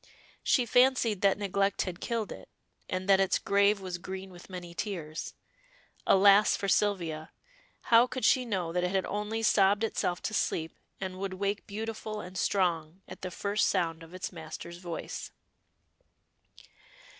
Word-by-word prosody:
She 250 - +3
fancied 245 -4 +3
that 195 -1 +4
neglect 200 -1 0
had 180 -2 -6
killed 230 -3 -2
it, - - -10 0.4
and 185 0 -3
that 195 -1 +6
its 195 -1 +3
grave 200 +1 +3
was 185 -2 -5
green 190 +1 -7
with 175 +1 -13
many 175 -2 -7
tears. 170 -6 -5 0.7
Alas 200 +2 +6
for 200 - -3
Sylvia! 170 -7 0 0.5
how 235 +1 +5
could 255 0 -3
she 255 - +4
know 185 -8 -2
that 180 0 0
it 180 - +1
had 190 0 0
only 210 +2 -3
sobbed 205 0 +4
itself 180 -5 -1
to 220 - -2
sleep, 160 -5 -1 0.2
and 185 -1 -5
would 195 -1 -3
wake 200 +1 -2
beautiful 215 0 -5
and 180 -1 -9
strong 180 -2 0
at - - -10
the 185 - -4
first 200 +4 0
sound 165 -4 0
of 165 +2 -12
its 185 - -4
master's 170 0 -8
voice. 175 -2 -6
195 Hz, 155 wpm, -30 LUFS, 180-210 Hz, 0.7 s, that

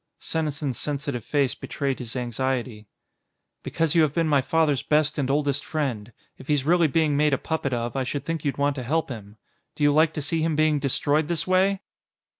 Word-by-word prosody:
Senesin's 150 -4 -2
sensitive 140 -4 -3
face 140 -3 +1
betrayed 135 -2 -3
his 120 -2 -5
anxiety. 120 -3 -2 0.7
"Because 165 -2 0
you 165 - +5
have 150 -2 +1
been 165 -1 +2
my 145 -3 +3
father's 150 -1 +1
best 150 0 +1
and 135 -2 -1
oldest 140 0 +1
friend. 125 -8 -3 0.3
If 130 - -12
he's 145 -3 +1
really 170 +1 +4
being 155 0 +1
made 150 -1 +3
a - - -3
puppet 160 -2 -2
of, 120 0 -2
I 135 - 0
should 135 +2 -3
think 165 -2 -3
you'd 140 -2 -1
want 145 0 +1
to 130 - -3
help 155 +6 0
him. 105 -4 -9 0.4
Do 150 - -3
you 145 0 +5
like 155 +1 +4
to 150 - -3
see 160 +3 0
him 160 -1 0
being 155 -1 +2
destroyed 145 +2 +1
this 165 -1 -1
way?" 190 +1 +2
145 Hz, 205 wpm, -25 LUFS, 130-155 Hz, 0.7 s, you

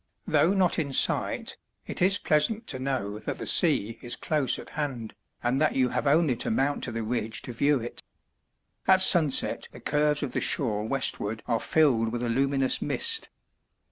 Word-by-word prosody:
Though 185 +5 +2
not 185 -2 +1
in 140 -4 -3
sight, - - +1 0.3
it - - -6
is 195 +2 +4
pleasant 200 +8 0
to 130 - -2
know 120 -6 -3
that - - -5
the - - -6
sea 110 +3 +4
is 120 - 0
close 150 -4 0
at - - -10
hand, 135 -7 -5 0.3
and 125 +4 0
that 155 - +1
you 130 -2 +2
have 145 - -2
only 150 -2 +3
to - - -2
mount 135 +5 -1
to 120 - -5
the 115 0 -4
ridge 110 -1 -3
to 125 - -7
view 140 +4 +1
it. 120 +1 -7 0.9
At 190 0 +5
sunset 165 -7 +4
the - - -12
curves 150 0 0
of 135 - -4
the - - -2
shore 105 -6 -1
westward 110 -4 -2
are 115 -2 -1
filled 120 -8 +1
with 120 +1 -4
a 120 - -2
luminous 135 +2 0
mist. 455 -1 0
135 Hz, 185 wpm, -26 LUFS, 115-150 Hz, 0.9 s, At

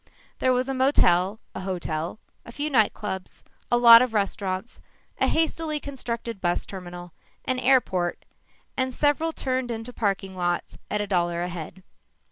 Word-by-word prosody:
There 255 - +3
was 255 +1 +1
a 270 - -1
motel, 215 -7 +3
a - - -5
hotel, 175 -2 -3 0.3
a - - -11
few 290 +5 -3
night 220 -6 +4
clubs, 190 -3 -6 0.3
a 240 - +5
lot 235 -1 +10
of 250 -3 0
restaurants, 195 +1 -2 0.4
a - - +3
hastily 320 -1 0
constructed 235 -6 -5
bus 175 -1 0
terminal, 175 -2 -9 0.3
an 255 -1 0
airport 195 -10 +2 0.5
and 260 -1 -1
several 300 +2 +1
turned 260 -4 -2
into 230 +1 -5
parking 195 -3 -1
lots 175 -1 -2
at 210 - 0
a - - -1
dollar 175 -3 0
a 180 - -3
head. 175 +2 -8
215 Hz, 155 wpm, -25 LUFS, 180-255 Hz, 0.5 s, lot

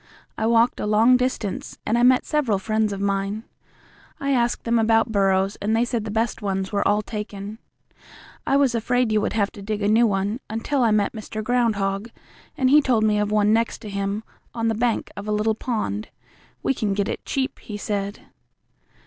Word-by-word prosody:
I 220 - -1
walked 230 +1 +3
a - - -2
long 220 +4 +5
distance, 250 -5 -2
and 220 - +1
I 240 - +2
met 250 +1 +5
several 275 -10 +1
friends 215 +2 0
of 200 - -4
mine. 200 +2 -1 0.8
I 280 0 -1
asked 240 -2 +1
them 235 0 +2
about 225 +1 +3
burrows, 195 -1 +2
and 215 +2 0
they 235 +2 +2
said 235 -3 -2
the - - -4
best 225 +2 -1
ones 195 -2 -2
were 205 - +1
all 210 +1 +2
taken. 210 -1 -6 0.9
I 275 - +3
was 275 -4 +3
afraid 245 +1 +1
you 215 -1 +2
would - - -1
have 205 -2 +1
to 205 - -11
dig 210 +1 -3
a - - +2
new 225 +3 +4
one, 200 +3 -1
until 230 +6 -1
I 235 - +4
met 210 -1 +1
Mr. 215 -1 -6
Groundhog, 215 -3 0 0.5
and 260 -1 +2
he 300 +1 +7
told 245 -6 +2
me 210 -1 +2
of 210 0 0
one 210 0 +3
next 230 +1 +1
to 215 - -6
him, 200 +2 -2 0.3
on 230 -1 0
the - - +1
bank 230 +1 -1
of 200 +1 -7
a - - -1
little 210 +1 +1
pond. 215 -2 -3 0.6
We - - +2
can 210 -6 -1
get 200 0 0
it - - -4
cheap, 270 0 -2
he 210 -3 -7
said." 205 0 -3
215 Hz, 205 wpm, -23 LUFS, 205-235 Hz, 0.9 s, he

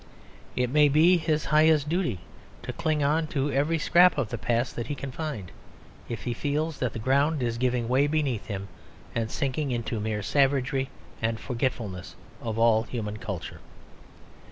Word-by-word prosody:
It 125 -1 0
may 150 0 +5
be 165 +5 +5
his 155 -2 0
highest 155 -1 +4
duty 160 - -1 0.4
to - - -5
cling 155 -2 0
on 155 +3 +2
to 145 -1 -1
every 145 +5 +1
scrap 175 +2 +5
of 130 -8 0
the - - -3
past 120 +2 0
that 120 - -4
he 145 - -3
can 140 0 -6
find, 135 - -5 0.6
if 115 -2 -5
he 120 - -2
feels 150 +3 -2
that 125 -3 -1
the - - -5
ground 140 +5 +2
is 115 -1 -1
giving 125 -2 0
way 130 +4 +3
beneath 145 -7 -1
him 100 -2 -4 0.5
and 115 -1 -1
sinking 140 +3 -1
into 115 -2 -2
mere 105 0 -2
savagery 135 +1 +1 0.3
and 110 0 0
forgetfulness 115 -7 -3 0.3
of 115 -1 -3
all 115 -1 +4
human 110 -3 -5
culture. 100 -5 -6
130 Hz, 170 wpm, -27 LUFS, 115-150 Hz, 0.6 s, may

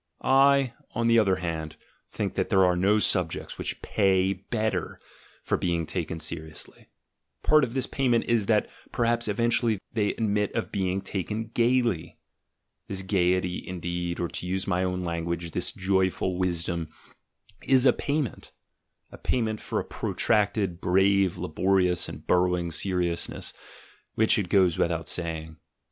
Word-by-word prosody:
I, 135 -1 +4 0.2
on 115 +1 0
the 115 0 +5
other 100 -4 +3
hand, 80 -3 -4 0.3
think - - -3
that - - -1
there 95 -1 +5
are 90 -1 +3
no 100 +4 +3
subjects 90 -5 0
which - - -4
pay 95 -2 +2
better 100 -1 -3 0.4
for - - 0
being 85 -2 -1
taken 80 -1 -3
seriously; 80 0 -6 0.6
part 155 -1 +5
of 120 -1 -2
this 130 -1 0
payment 125 -4 +1
is, 115 -4 +1
that 105 -2 +3 0.2
perhaps 120 0 +1
eventually 115 +1 +1 0.2
they 105 -2 0
admit 105 -2 0
of 115 - -2
being 95 -1 -1
taken 105 +4 -4
gaily. 120 -7 +1 0.7
This 95 -1 -3
gaiety, 90 -2 +1
indeed, 85 -1 -4
or, 85 - 0
to 90 - -5
use 95 +1 -2
my 90 -2 0
own 90 0 -2
language, 85 0 -3
this 90 +7 0
joyful 95 -3 0
wisdom, 85 -2 -1 0.8
is 130 -1 +4
a 125 - +6
payment; 145 -3 -3 0.6
a - - -12
payment 110 -3 -1
for - - -3
a - - -4
protracted, 100 -4 0
brave, 95 0 +3
labor 95 +5 +1
ious, 90 -1 +1
and - - -9
burrowing 90 -1 +2
seriousness, 90 -1 -2 0.6
which, 110 0 +3
it 95 -4 -3
goes 90 -3 +3
without 85 +1 0
ing. 80 -2 -5
95 Hz, 145 wpm, -27 LUFS, 90-110 Hz, 0.8 s, a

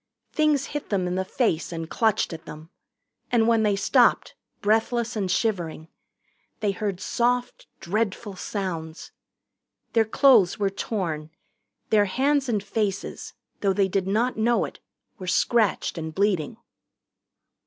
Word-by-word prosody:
Things 300 -3 +2
hit 295 - -4
them 195 -3 0
in 180 - -2
the 190 +1 0
face 190 -5 -1
and 165 -1 -5
clutched 220 -1 +1
at 160 - -9
them. 155 +2 -10 0.6
And 230 -2 +3
when 230 -1 +4
they 210 -2 +2
stopped, 195 - +3 0.3
breathless 225 +3 +1
and 195 -3 -1
shivering, 175 -6 -1 0.7
they 210 -2 +1
heard 195 -1 -3
soft 245 +4 -1
dreadful 200 +1 -2
sounds. 170 -5 -5 0.8
Their 225 -1 +4
clothes 220 -5 +5
were 200 -2 0
torn. 165 -8 -3 0.6
Their 210 -2 +5
hands 270 +6 +1
and 210 -4 0
faces, 200 -1 -3 0.2
though 195 -2 +2
they 195 0 +2
did 190 0 -1
not 225 +5 +1
know 230 +2 +2
it, - - -10 0.4
were 185 - -7
scratched 210 -1 +1
and 160 -1 -6
bleeding. 195 -2 0
205 Hz, 135 wpm, -25 LUFS, 180-230 Hz, 0.8 s, clothes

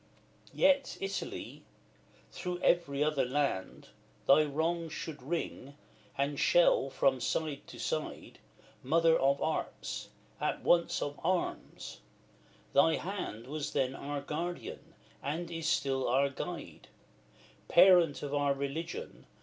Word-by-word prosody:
XLVII. - - -15
Yet, 280 -1 +3
Italy! 195 0 -5 0.7
through 180 -1 -4
every 150 -5 +2
other 150 -2 +1
land 130 -7 -2 0.4
Thy 140 +3 +7
wrongs 160 +2 -1
should 150 -4 -6
ring, 140 -1 -4 0.4
and 140 +1 0
shall, 170 -5 +4
from 130 -1 +2
side 150 0 -2
to - - -10
side; - - -4 0.4
Mother 165 +4 +4
of 140 -1 +2
Arts! 160 - -3 0.3
as - - -1
once 170 -1 +3
of 145 0 -5
Arms; 180 +1 -2 0.7
thy 160 +3 +5
hand 175 - -5
Was 150 +2 -4
then 135 -2 +1
our 140 +1 -4
Guardian, 170 +5 -5 0.3
and 165 +5 -3
is 165 -1 -3
still 135 -6 +1
our 135 +3 +3
guide; - - -7 0.8
Parent 175 -5 +6
of 145 -1 -4
our 145 -1 +2
religion! 160 - -5
150 Hz, 120 wpm, -32 LUFS, 140-170 Hz, 0.8 s, Thy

